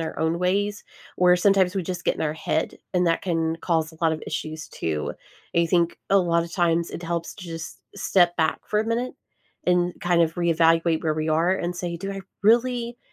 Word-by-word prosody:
our 160 -2 -4
own 160 +1 0
ways 205 +3 0 0.3
or 180 0 +5
sometimes 190 0 +3
we 190 - 0
just 180 0 -5
get - - +1
in - - -7
our 150 -1 0
head, 160 0 -2
and 180 -1 +2
that 165 - +1
can 165 -2 0
cause 160 -2 -1
a - - -15
lot 160 -1 +4
of 155 - -4
issues 155 0 -5
too. 75 -2 -3 0.4
I 170 - +4
think 170 0 +1
a 195 - +6
lotta 170 -1 +1
times 170 -1 +1
it 175 - -7
helps 170 0 -3
to 185 - -9
just 165 -2 -7
step 180 -3 +3
back 160 -1 +1
for 210 - +1
a - - -1
minute 240 +2 -1 0.5
and 180 0 +2
kind 175 -1 +2
of 160 -1 +2
reevaluate 165 -1 +3
where 155 -1 +1
we 155 0 -2
are 165 +4 +3
and 175 0 -3
say, 175 -1 -3
"Do 195 +3 -5
I 195 - -5 0.2
really 240 +2 +2
170 Hz, 210 wpm, -24 LUFS, 165-185 Hz, 0.5 s, a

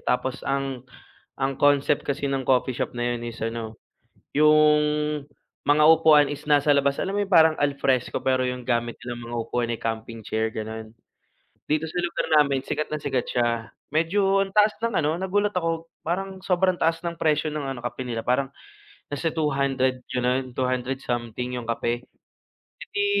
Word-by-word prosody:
Tapos 130 +1 -1
ang 135 -2 -2 0.5
ang 135 0 0
concept 145 0 +3
kasi 140 +1 -1
ng 135 -1 -1
coffee 130 0 +3
shop - - -2
na 120 0 0
yun - - -8
is 115 - -8
ano, 115 -1 -4 0.6
yung 150 0 +5 0.8
mga 150 +1 +4
upuan 155 -2 +6
is 145 0 -7
nasa 145 0 +4
labas, 140 0 +2
alam 195 - -2
mo 205 - +1
parang 160 -3 +6
al 145 -1 +1
fresco 130 -3 +1
pero 130 -1 +1
yung 125 0 -3
gamit 120 -1 -1
nilang 120 -1 -6
mga 120 - -3
upuan, 120 0 -1
eh, 115 - -2
camping 115 0 -4
chair 110 0 0
ganon? 110 0 -6 0.8
Dito 155 +1 +1
sa 170 +3 -3
lugar 175 - -2 0.2
namin 140 -2 0
sikat 155 - -2
na 155 - -1
sikat 135 -4 -1
siya, 120 -2 0 0.2
medyo 195 +5 +2
ang 195 - -7
taas 210 0 +5
ng 230 -1 -1
ano, 155 -1 +1
nagulat 205 +2 0
ako 165 -2 -1 0.2
parang 190 +3 -3
sobrang 185 0 +2
taas 165 0 +2
ng 170 0 -2
presyo 155 -1 +2
ng 150 -1 -3
ano 135 -2 -4
kape 120 - -4
nila 115 -2 -3
parang 130 +2 +1 0.6
nasa 155 +3 -1
200 135 -4 0
ganun, 125 +1 0
200 130 0 -1
something 120 +1 -3
yung 120 - -8
kape. 120 +1 -2 0.7
Eh, - - -13
di 405 0 +2
140 Hz, 175 wpm, -25 LUFS, 125-155 Hz, 0.8 s, upuan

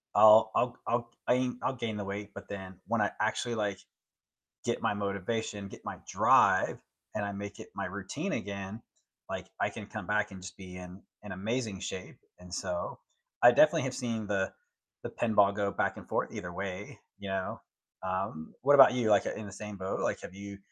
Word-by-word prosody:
I'll 110 0 +9
I'll 125 0 +2
I'll 120 0 0 0.2
I 125 0 +3
I'll 135 - +1
gain 115 -3 -3
the 105 - -2
weight, 100 +1 -5
but 100 - -9
then 95 -2 -6
when 115 0 +2
I 105 - +2
actually, 115 +2 0
like, 100 -3 -1 0.9
get - - -1
my - - +2
motivation, 100 +1 -2
get - - -12
my - - -5
drive, - - +5 0.4
and 105 - -1
I 100 - -2
make 100 0 -6
it - - -9
my - - -2
routine 100 - -4
again, 100 - -4 0.5
like, - - -4
I - - +3
can - - -7
come - - -6
back 105 0 +1
and 95 -1 -9
just 90 -1 -8
be 90 -1 -9
in 90 +1 -9 0.2
in 105 - -6
amazing 110 +1 -2
shape. 95 -1 -6 0.2
And 90 0 -13
so 90 -2 -3 0.4
I 120 - +11
definitely 155 +5 +5
have 130 0 -2
seen 115 -4 -2
the 95 -1 0 0.5
the - - -3
pinball 105 -4 +3
go 100 -1 0
back - - 0
and - - -10
forth - - 0
either 90 - -5
way, 95 +2 -5 0.2
you 100 - -6
know? 95 -1 -2 0.4
Um, 95 -4 -3
what 145 +2 +6
about 135 -3 +10
you? 120 -3 +2
Like, 100 -2 +5
in 110 - -3
the 100 - -9
same 105 +1 -7
boat? 95 0 -3
Like, - - 0
have 90 - -8
you 100 0 -8
100 Hz, 195 wpm, -31 LUFS, 95-110 Hz, 0.9 s, I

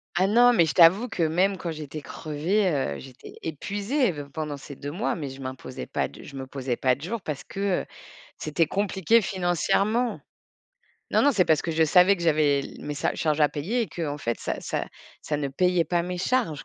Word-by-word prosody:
Ah 185 +2 +3
non, 240 +4 +6
mais 170 -7 +5
je 150 - -2
t'avoue 185 +8 +6
que 180 -6 -2
même 185 +5 +2
quand 170 - -4
j'étais 155 -1 -7
crevée, 165 +9 -1 0.3
heu, - - -7
j'étais 130 -1 -12
épuisée 205 - -1
v 145 -3 -7
pendant 150 -2 -4
ces 140 +1 -10
2 145 +2 -6
mois, 195 +9 -1
mais 145 -5 -5
je 135 +1 -10
m'imposais 130 - -7
pas - - -1
de, - - -13
je 140 - -11
me 135 -1 -5
posais 130 -2 -3
pas 130 -1 +2
de 140 - -17
jour 205 +7 -4
parce 150 -4 -5
que, 195 -2 -1
heu, - - -13 0.5
c'était 155 +2 0
compliqué 200 +4 +2
financièrement. 195 +6 0 0.9
Non, - - +3
non, 285 - +5
c'est 195 -6 +3
parce 155 -2 +3
que 170 - -2
je 160 0 +3
savais 180 +5 +5
que 170 - -7
j'avais 150 -3 +3
l - - -9
mes 150 - -4
sa 145 - -1
charges 155 -1 0
à 150 - +6
payer 190 +14 -1
et 225 - -2
qu'en 150 -4 -4
fait, 120 -4 -3
ça - - -3
ça - - -3 0.4
ça 150 - -2
ne 140 -1 -2
payait 180 +4 +2
pas 170 +2 0
mes 180 0 -4
charges, 185 - 0
165 Hz, 220 wpm, -26 LUFS, 145-195 Hz, 0.9 s, non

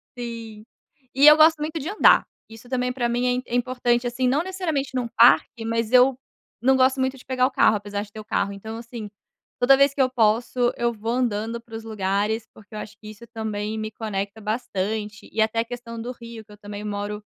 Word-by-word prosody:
Sim, 230 -3 -7 0.5
e 275 +2 +4
eu 300 - +10
gosto 315 0 +6
muito 310 +2 -3
de 305 +6 -5
andar, 420 - +5 0.2
isso 225 +2 -13
também 250 -1 -1
para 240 -2 -1
mim 245 +1 0
é - - -10
é - - +2
importante 245 -1 0
assim, 250 +2 -1
não 275 +4 +2
necessariamente 340 -8 -3
em - - +1
um 240 - -3
parque, 235 0 +4
mas 230 0 -1
eu 255 0 +5 0.4
não 265 +2 +4
gosto 260 +1 +3
muito 260 +1 -1
de - - -16
pegar 255 -1 +1
o 265 - 0
carro, 255 -5 +4
apesar 205 0 -4
de 205 - -15
ter 215 - -9
o 215 - -9
carro 200 -2 -1
então 220 +3 -8
assim, 230 -2 -8 0.5
toda 270 +2 +6
vez 275 0 +4
que 275 - 0
eu 255 - +3
posso 240 +1 +1
eu 235 0 +1
vou 225 +1 -4
andando 235 -2 -1
para 230 -1 -12
os 225 - -7
lugares, 215 +1 -1
porque 215 0 -18
eu 210 - -4
acho 210 - -9
que 215 - -11
isso 215 +2 -12
também 220 -2 -4
me 215 0 -4
conecta 210 -1 -5
bastante 210 -1 -3
e 220 - 0
até 220 +1 +1
a 230 - +1
questão 230 -1 -7
do 245 - -5
rio 235 -2 -10
que 210 - -19
eu 210 - -13
também 205 0 -8
moro 210 0 -4
230 Hz, 230 wpm, -23 LUFS, 215-255 Hz, 0.5 s, eu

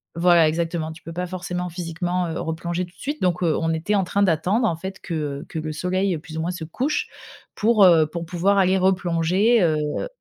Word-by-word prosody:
voilà, 170 -1 +5
exactement, 165 0 -2
tu 160 - -12
peux 165 - -8
pas 180 +1 -3
forcément, 180 0 -4
physiquement, 175 +1 -2
heu, 160 - -4
replonger 170 +2 -3
tout 175 - -19
de - - -25
suite. 290 +3 -3
Donc, 180 0 +1
heu, 165 -3 +2
on 165 0 0
était 175 +6 -1
en 195 - +2
train 200 +3 0
d'attendre, 190 +7 +2
en 165 - 0
fait, 190 +4 -7
que 150 -4 -4
que - - -6
le 155 0 -4
soleil, 185 +3 0
plus 160 0 -9
ou 160 - -1
moins, 170 - -1
se 170 -3 -6
couche 260 - -1 0.5
pour, 215 -1 +4
heu, 165 -3 +6
pour 170 +2 -5
pouvoir 180 +4 +1
aller 190 0 +3
replonger, 185 +4 +2
heu 155 - 0
175 Hz, 215 wpm, -23 LUFS, 160-185 Hz, 0.5 s, heu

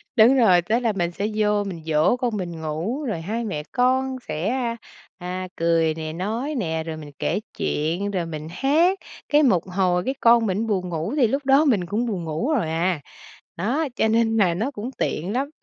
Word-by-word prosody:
Đúng 235 +3 +6
rồi, 185 -8 +5
tức 215 +7 +1
là 235 -3 +1
mình 175 -3 -1
sẽ 200 +4 -2
vô 210 -1 +2
mình 180 -5 -6
dỗ 160 +8 +3
con 240 -4 -1
mình 170 -4 -5
ngủ, 165 - -3
rồi 215 - -3
hai 220 +7 -3
mẹ 155 -9 -3
con 260 +1 +1
sẽ, 155 +6 -2
a, 240 -2 -1 0.4
à, 185 0 -5
cười 165 -1 +2
nè, 155 0 -5
nói 225 - -3
nè, 160 -9 -1
rồi 160 -1 -5
mình 150 -2 -9
kể - - 0 0.2
chuyện, 170 +7 -1
rồi 180 -4 -1
mình 155 -2 -6
hát, 320 - +2 0.3
cái 300 +1 +5
một 190 - +3
hồi 180 -1 +1
cái 265 - 0
con 235 0 +5
mình 205 +3 -1
buồn 185 -4 -1
ngủ 165 - -3
thì 255 -5 +5
lúc 275 +5 -2
đó 275 +3 +5
mình 215 -11 +2
cũng 210 +7 -1
buồn 200 -7 -3
ngủ 160 - -2
rồi 215 - 0
à. 165 0 0 0.6
Đó, 255 - 0
cho - - +2
nên 225 0 +2
là 185 -5 +3
nó 220 +11 -2
cũng 235 -2 -5
tiện 180 +7 -2
lắm. 270 +3 -1
205 Hz, 210 wpm, -23 LUFS, 170-240 Hz, 0.6 s, Đúng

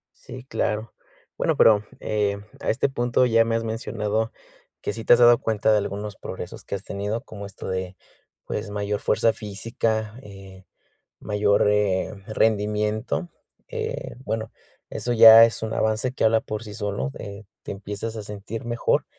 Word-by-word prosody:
Sí, 130 0 -10
claro. 110 -4 -2 0.4
Bueno, - - 0
pero, 105 -2 +6 0.2
eh, 105 -1 0 0.2
a - - -2
este 115 - +2
punto 120 -1 +1
ya 115 -2 +4
me 115 0 0
has 115 - 0
mencionado 110 -1 -2 0.5
que - - -3
sí 115 - -6
te 110 - +6
has 120 - +5
dado 120 -1 +7
cuenta 110 0 +1
de 105 - +4
algunos 100 +1 -4
progresos - - -8
que - - -4
has 95 - -7
tenido, 105 +3 -3
como 100 -3 -9
esto 100 -1 -9
de, 95 0 -4 0.5
pues, 105 0 -4
mayor 105 0 -2
fuerza 115 +1 +2
física, 110 +1 -3
eh, 95 -4 -13 0.5
mayor, 105 -1 +2
eh, 105 -3 +1
rendimiento, 105 - 0 0.4
eh, - - -4
bueno, 110 0 -3 0.4
eso 120 - -2
ya 115 0 +10
es 115 - -3
un 110 0 -3
avance 110 +3 0
que - - -3
habla 110 0 +4
por 110 +1 -5
sí 105 -2 -9
solo, 100 - -3
eh, 100 +1 -8 0.2
te - - -6
empiezas 105 +3 -5
a 110 - -5
sentir 105 +3 -7
mejor. 120 0 +1
105 Hz, 165 wpm, -24 LUFS, 100-115 Hz, 0.5 s, ya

